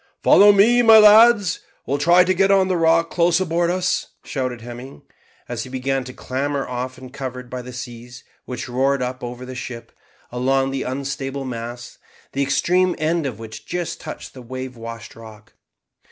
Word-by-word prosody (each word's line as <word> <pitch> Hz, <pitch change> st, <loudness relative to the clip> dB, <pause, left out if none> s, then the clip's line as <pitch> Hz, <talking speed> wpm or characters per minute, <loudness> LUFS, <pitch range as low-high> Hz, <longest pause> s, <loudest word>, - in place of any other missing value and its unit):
"Follow 205 Hz, +1 st, +7 dB
me, 225 Hz, +5 st, +5 dB
my 225 Hz, -2 st, +8 dB
lads, 215 Hz, -2 st, +6 dB
and -, -, -26 dB, 0.2 s
we'll 140 Hz, -, -1 dB
try 170 Hz, +4 st, +5 dB
to 185 Hz, +1 st, +1 dB
get 195 Hz, +1 st, +2 dB
on 195 Hz, -1 st, +3 dB
the 185 Hz, -, +1 dB
rock 165 Hz, 0 st, +2 dB
close 170 Hz, 0 st, +2 dB
aboard 170 Hz, -1 st, 0 dB
us," 185 Hz, 0 st, -1 dB, 0.2 s
shouted 130 Hz, -4 st, -4 dB
Hemming, 120 Hz, +3 st, -10 dB, 0.4 s
as 120 Hz, -2 st, -4 dB
he 130 Hz, -, -7 dB
began 135 Hz, +1 st, -2 dB
to 125 Hz, -, -8 dB
clamber, 135 Hz, +2 st, -3 dB
often 130 Hz, +1 st, -6 dB
covered 125 Hz, -2 st, -7 dB
by 125 Hz, 0 st, -4 dB
the 125 Hz, +1 st, -10 dB
seas 120 Hz, 0 st, -9 dB, 0.2 s
which 125 Hz, -1 st, -6 dB
roared 135 Hz, +2 st, 0 dB
up 125 Hz, +1 st, -5 dB
over 125 Hz, +1 st, -6 dB
the 130 Hz, -, -8 dB
ship, 125 Hz, -2 st, -8 dB, 0.4 s
along 135 Hz, +2 st, 0 dB
the 135 Hz, 0 st, -3 dB
unstable 135 Hz, +1 st, -4 dB
mast, 120 Hz, 0 st, -7 dB, 0.3 s
the 140 Hz, -, -2 dB
extreme 180 Hz, +6 st, +1 dB
end 160 Hz, 0 st, 0 dB
of 120 Hz, -6 st, -6 dB
which 110 Hz, -1 st, -10 dB
just 175 Hz, -2 st, -4 dB
touched 155 Hz, -, -8 dB
the 130 Hz, -, -11 dB
wave 130 Hz, +1 st, -7 dB
washed 115 Hz, -1 st, -9 dB
rock. 110 Hz, -1 st, -14 dB
135 Hz, 180 wpm, -21 LUFS, 125-170 Hz, 0.4 s, my